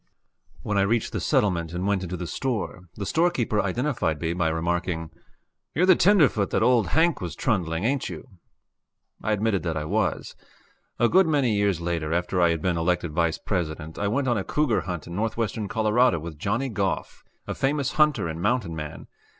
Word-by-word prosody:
When 105 -1 0
I - - +4
reached 110 +3 +1
the - - -1
settlement 85 -5 +1
and 90 +2 -2
went 100 -2 +1
into 90 0 -4
the 90 - -5
store, 100 -5 -3
the 100 - -5
storekeeper 130 - +1
identified 100 - -1
me 80 +1 -1
by 85 -2 0
remarking: 85 0 -2 0.6
"You're 175 - +3
the 185 -1 +7
tenderfoot 155 - +4
that - - +1
old 120 -5 +4
Hank 160 - +2
was - - -5
trundling, 90 - -1
ain't 135 +3 0
you?" - - -8 0.9
I 110 - -1
admitted 105 -2 +1
that 80 -2 -2
I 75 - -3
was. - - -1 0.6
A 120 - +4
good 185 +6 +4
many 140 -7 +2
years 100 -4 +1
later, 85 -2 -2
after 90 +1 0
I 85 - +5
had 85 -2 -1
been 90 -2 +1
elected 90 0 0
Vice 85 0 +1
President, 80 -4 -4
I 100 - 0
went 130 +6 0
on 120 -4 +2
a - - -3
cougar 150 -4 +1
hunt 90 -4 -5
in 85 - -7
northwestern 110 0 -2
Colorado 110 -1 +2
with 80 -1 -8
Johnny 120 - -1
Goff, 100 -4 -3 0.2
a - - -3
famous 140 0 0
hunter 150 - +2
and 80 +1 -5
mountain 105 -5 0
man. 75 -2 -7
100 Hz, 190 wpm, -25 LUFS, 85-120 Hz, 0.9 s, the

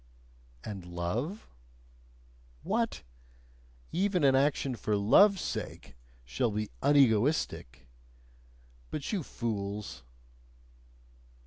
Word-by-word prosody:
"And 100 -4 -6
love?" 90 - -4 1.2
What! 225 +5 -1 0.9
Even 185 -1 +1
an 135 -1 +5
action 135 -1 +1
for 105 -2 -1
love's 190 - +5
sake - - -5 0.3
shall 65 - 0
be 105 0 -3
"unegoistic"? 130 - +2 1.0
But 150 +7 -4
you 195 - 0
fools 105 - -4
125 Hz, 80 wpm, -30 LUFS, 100-160 Hz, 1.2 s, an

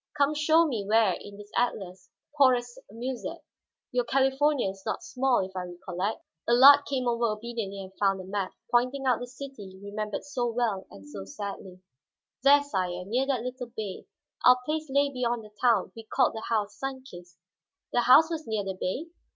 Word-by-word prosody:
"Come 285 +1 +3
show 315 +2 +4
me 235 -10 -2
where 215 -1 +3
in 200 +2 -9
this 205 0 -12
atlas, 185 -6 -2 0.3
pour 270 -4 +6
s'amuser. 240 +1 -7 0.5
Your 245 0 +1
California 270 +1 +2
is 195 0 -14
not - - -3
small, 265 - +1
if 190 0 -12
I 180 -1 -3
recollect." 180 +3 -4 0.3
Allard 275 +4 +8
came 260 -3 -1
over 235 0 +1
obediently 215 -3 -4
and 190 0 -12
found 195 -1 +2
the - - -7
map, 195 0 -3 0.2
pointing 255 +3 +1
out 250 -3 +3
the 245 - -6
city 245 -7 -10
remembered 210 +1 -4
so 255 -4 -2
well 230 -5 -1
and 100 -1 -13
so 100 -1 -8
sadly. 190 - -7 0.6
"There, 285 +2 +6
sire, 180 -9 -3
near 250 +7 0
that 255 -5 0
little 250 0 -5
bay. 205 -4 -5 0.4
Our 250 0 +7
place 310 +1 -2
lay 280 +1 +2
beyond 240 -3 -1
the 210 - -14
town; 225 -7 +3
we 225 - -8
called 220 - +1
the 220 - -6
house 210 -3 0
Sun 270 -1 -4
Kist." 175 -8 -13 0.6
"The 245 - +3
house 300 +7 +6
was 320 -1 -4
near 220 -2 -1
the 195 0 -3
bay?" 190 - -3
235 Hz, 185 wpm, -28 LUFS, 195-265 Hz, 0.6 s, Allard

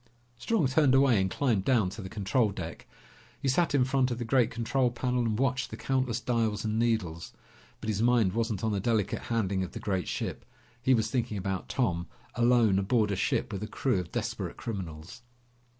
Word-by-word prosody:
Strong 210 - +1
turned 135 -1 +4
away 130 -6 +5
and 95 - 0
climbed 115 -3 +1
down 115 -4 +3
to 100 +4 -6
the 95 - -7
control 105 +3 +1
deck. 85 -4 -7 0.5
He - - -3
sat 145 +4 +2
in 130 -3 +4
front 130 -1 +1
of 120 - -2
the 120 - -4
great 120 0 +3
control 125 +2 0
panel 125 +1 -1
and 115 -3 0
watched 130 +1 0
the - - -7
countless 130 -3 0
dials 115 -3 0
and 110 +1 0
needles. 105 -9 -1 0.5
But - - -6
his 105 -1 0
mind 115 -5 +3
wasn't 115 -3 -1
on 110 - +1
the 100 - 0
delicate 105 -1 0
handling 100 -5 0
of 95 - -4
the - - -5
great 95 -3 -2
ship. - - -4 0.4
He 130 +1 +4
was 110 - 0
thinking 120 -5 -1
about 95 -1 -3
Tom, 85 -9 0 0.3
alone 120 -5 +4
aboard 105 +1 +1
a - - 0
ship 105 +1 -1
with 100 - -4
a 105 - -3
crew 125 -3 0
of 85 -1 -6
desperate - - -3
criminals. 90 -3 -6
115 Hz, 200 wpm, -29 LUFS, 100-125 Hz, 0.5 s, away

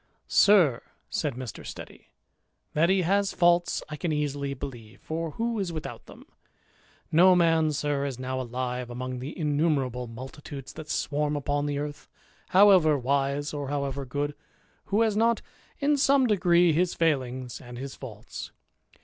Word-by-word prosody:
" - - -46 0.2
Sir," 170 - +5 0.3
said 145 -5 -1
Mr. 125 -3 -7
Steady, - - -10 0.3
" - - -48
that 165 +3 +3
he 190 -1 +3
has 200 +3 +1
faults 175 0 +3
I 150 - -6
can 165 +2 -2
easily 145 -2 -2
believe, 120 -5 -9
for 160 -1 -4
who 230 -1 -1
is 190 -3 -2
without 155 -2 -7
them? - - -13 0.9
No 180 +3 +6
man, 165 -3 +3
sir, 145 -1 -1
is 135 -4 -4
now 130 0 -3
alive, 125 0 -4
among 130 +1 -5
the 135 +5 -7
innumerable 145 -6 0
multi 130 +6 -9
tudes 135 -2 -8
that 155 -1 -9
swarm 150 0 -1
upon 145 0 -1
the 145 -1 -2
earth, 145 0 -6 0.4
however 185 -6 +6
wise 140 +2 0
or 145 -2 -4
however 140 -1 -2
good, 145 +3 -3 0.5
who 205 +3 +1
has 220 -2 +2
not, 230 +1 +2 0.3
in 290 +1 +2
some 275 -1 +4
degree, 175 -6 +4
his 175 +3 +1
failings 130 -6 -1
and 120 -1 -10
his 135 +1 -6
faults. 110 -5 -9
145 Hz, 160 wpm, -27 LUFS, 130-170 Hz, 0.9 s, No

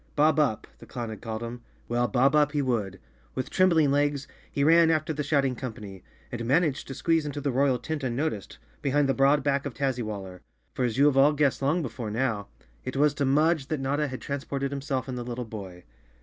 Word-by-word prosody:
"Bob 150 0 +4
Up," 135 -8 +1
the - - -13
clown 120 -2 -5
had 110 - -8
called 110 0 -5
him. 120 +1 -6 0.3
Well, 120 +1 +1
bob 130 +5 +3
up 150 -1 +3
he 145 - +1
would. 105 -7 -1 0.4
With 130 - -3
trembling 165 -6 +4
legs, 145 -1 +1 0.2
he 140 - 0
ran 165 +2 +6
after 155 0 +1
the 150 - -3
shout¬ 140 -1 +2
ing 130 -1 -1
company, 105 -6 -8 0.3
and 120 -1 -4
managed 140 +3 +1
to 135 - -6
squeeze 165 +2 +1
into 145 0 -4
the 140 -1 -1
royal 130 0 +2
tent 155 +2 -4
unnoticed, 125 -4 -2 0.2
behind 145 +1 +2
the 135 - +2
broad 140 +1 +3
back 140 -1 +1
of 135 - -8
Tazzywaller. 110 -9 -3 0.3
For 125 - 0
as 120 -1 -2
you 140 - +5
have 145 -2 +3
all 140 +3 +6
guessed 145 -3 +1
long 155 +5 +1
before 115 -3 -5
now, 110 -3 -1 0.4
it 130 - -5
was 145 +1 +4
to 145 - -1
Mudge 150 +1 +2
that 155 - -2
Notta 145 +3 0
had 130 -2 -6
transported 140 -1 -3
himself 140 -1 -3
and 125 -1 -4
the - - -4
little 120 0 -5
boy. 95 -5 -9
135 Hz, 220 wpm, -27 LUFS, 120-145 Hz, 0.4 s, ran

